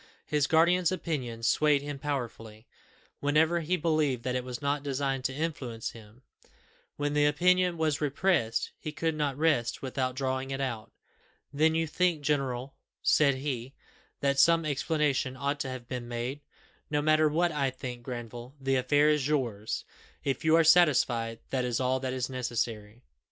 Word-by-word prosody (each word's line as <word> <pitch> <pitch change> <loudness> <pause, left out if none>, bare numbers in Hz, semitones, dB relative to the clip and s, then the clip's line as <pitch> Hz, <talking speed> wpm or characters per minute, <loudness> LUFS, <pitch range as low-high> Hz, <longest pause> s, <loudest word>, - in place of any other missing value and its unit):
His 150 -2 +1
guardian's 170 +3 +4
opinion 130 -11 -3
swayed 145 +3 +3
him 145 -1 -5
powerfully, 115 -6 -5 0.5
whenever 155 +4 +2
he 170 +3 0
believed 155 -7 +1
that 125 - -1
it 125 0 -1
was 125 -1 -6
not 140 0 -1
designed 135 -1 -2
to 130 - +1
influence 135 -8 -3
him; 115 +2 -15 0.7
when 145 0 -2
the 145 0 +4
opinion 180 +3 +3
was 155 -2 0
repressed, 145 -6 +1
he 155 - -5
could 160 +1 -1
not 145 -3 -1
rest 150 -8 +1
without 130 -1 -2
drawing 130 0 -2
it 135 0 -3
out. 120 -5 -4 0.6
"Then, 160 +2 +3
you 165 0 +1
think, 165 -1 0
general," 135 -2 -1 0.3
said 140 -3 +4
he, 130 -1 -4 0.5
"that 140 0 +1
some 165 +1 +5
explanation 145 -3 0
ought 140 +2 -1
to 135 - -3
have 130 -2 -7
been 125 -2 -5
made?" 120 +4 -4 0.5
"No 150 - +1
matter 155 0 +4
what 170 +3 +1
I 140 -3 0
think, 125 -1 -7
Granville, 120 +1 -7
the 135 0 +1
affair 145 +4 +3
is 150 -3 +2
yours. 120 -8 -2 0.4
If 135 -2 -2
you 160 0 +5
are 165 - +5
satisfied, 130 -9 +3
that 130 -2 0
is 120 -2 -1
all 130 0 +1
that 130 0 -3
is 130 -1 -2
necessary." 115 -3 -3
140 Hz, 165 wpm, -29 LUFS, 125-155 Hz, 0.7 s, some